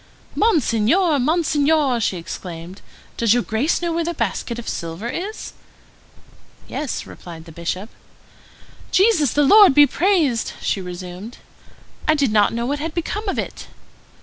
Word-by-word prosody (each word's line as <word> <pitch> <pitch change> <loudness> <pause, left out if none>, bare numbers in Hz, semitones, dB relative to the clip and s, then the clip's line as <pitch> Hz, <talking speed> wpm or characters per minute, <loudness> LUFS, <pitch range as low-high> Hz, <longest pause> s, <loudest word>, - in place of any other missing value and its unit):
"Monseigneur, 315 - +2
Monseigneur!" 300 -2 +2
she 200 -4 -1
exclaimed, 170 +1 -8 0.4
"does 230 -1 +3
your 245 - +1
Grace 270 +11 0
know 340 -1 0
where 335 0 0
the 340 +1 -3
basket 235 - -2
of 240 - -8
silver 170 +6 -4
is?" 385 - -5 1.1
"Yes," 295 -4 -4
replied 165 -2 -11
the 165 - -12
Bishop. 170 +5 -4 1.0
"Jesus 370 - +3
the 295 - +3
Lord 400 -1 +7
be 290 0 +8
blessed!" 320 - +1
she 195 - -1
resumed; 180 +5 -8 0.7
"I 310 - +4
did 280 -6 +1
not 210 -1 +4
know 235 +1 -2
what 285 +3 -2
had 315 +1 -4
become 410 +5 -3
of - - -2
it." - - -5
270 Hz, 145 wpm, -21 LUFS, 205-330 Hz, 1.1 s, be